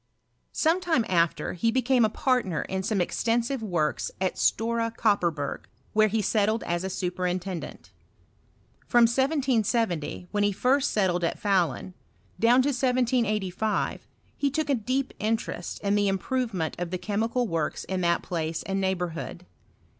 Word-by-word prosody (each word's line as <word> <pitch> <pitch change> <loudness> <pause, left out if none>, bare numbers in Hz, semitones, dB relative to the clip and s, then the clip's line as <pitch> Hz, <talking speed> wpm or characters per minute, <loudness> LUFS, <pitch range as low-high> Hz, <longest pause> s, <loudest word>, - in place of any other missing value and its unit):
Sometime 325 -6 +2
after, 170 -3 +1
he 205 +6 +1
became 255 0 +3
a 220 - +4
partner 230 - 0
in 190 0 -3
some 205 +1 -1
ex 175 - -2
tensive 240 +3 +1
works 175 -8 -1
at 185 -1 0
Stora 230 +1 +1
Kopperberg, 170 -10 0 0.3
where 215 0 +5
he 215 0 0
settled 215 +2 +1
as 175 +1 -2
a 190 - -2
superintendent. 180 -1 -3 1.0
From 240 -1 +6
J 230 - +2
770, 235 - 0
when 205 - 0
he 205 0 +3
first 260 +7 +2
set 195 -4 +2
tled 175 0 -1
at 170 - -1
Fahlun, 185 -3 0 0.5
down 245 +3 +5
to 285 - +1
1785, 235 -6 0 0.3
he 285 - 0
took 290 +1 -1
a - - +4
deep 255 +3 -1
interest 215 -5 -2
in 200 0 +1
the 205 0 +2
improvement 195 -3 -1
of 175 -1 -3
the 185 - -2
chemical 225 +5 -1
works 165 -5 -2
in 190 -1 -3
that 170 -1 +1
place 165 -2 -3
and 195 0 -2
neighbourhood. 180 -2 -3
210 Hz, 150 wpm, -27 LUFS, 180-240 Hz, 1.0 s, From